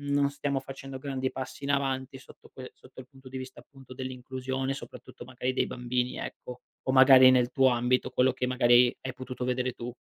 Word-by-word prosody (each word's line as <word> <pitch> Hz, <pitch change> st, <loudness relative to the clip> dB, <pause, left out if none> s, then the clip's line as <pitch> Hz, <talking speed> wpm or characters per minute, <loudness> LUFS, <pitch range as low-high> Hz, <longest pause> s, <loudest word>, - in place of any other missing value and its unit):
non 140 Hz, 0 st, +1 dB
stiamo 140 Hz, -1 st, -2 dB
facendo 135 Hz, 0 st, -9 dB
grandi 130 Hz, -1 st, -3 dB
passi 135 Hz, +2 st, -7 dB
in 140 Hz, -, -2 dB
avanti 135 Hz, -1 st, -1 dB
sotto -, -, -17 dB
quel 130 Hz, -1 st, -10 dB
sotto 130 Hz, -, -15 dB
il 125 Hz, -, -14 dB
punto 135 Hz, -1 st, -15 dB
di 130 Hz, -, -9 dB
vista 130 Hz, 0 st, -9 dB
appunto 135 Hz, -2 st, -15 dB
dell'inclusione, 130 Hz, +1 st, -4 dB
soprattutto 125 Hz, -2 st, -11 dB
magari 130 Hz, 0 st, -3 dB
dei -, -, 0 dB
bambini 125 Hz, 0 st, -2 dB
ecco? 125 Hz, 0 st, -8 dB, 0.2 s
O 130 Hz, -, 0 dB
magari 130 Hz, -1 st, +8 dB
nel 125 Hz, -1 st, +3 dB
tuo 130 Hz, 0 st, +4 dB
ambito, 125 Hz, +1 st, +1 dB
quello 130 Hz, +1 st, +2 dB
che 125 Hz, 0 st, -2 dB
magari 125 Hz, -1 st, +4 dB
hai 130 Hz, -, -5 dB
potuto 130 Hz, -1 st, -6 dB
vedere 125 Hz, 0 st, -1 dB
tu? 120 Hz, +1 st, -7 dB
130 Hz, 195 wpm, -28 LUFS, 125-135 Hz, 0.2 s, magari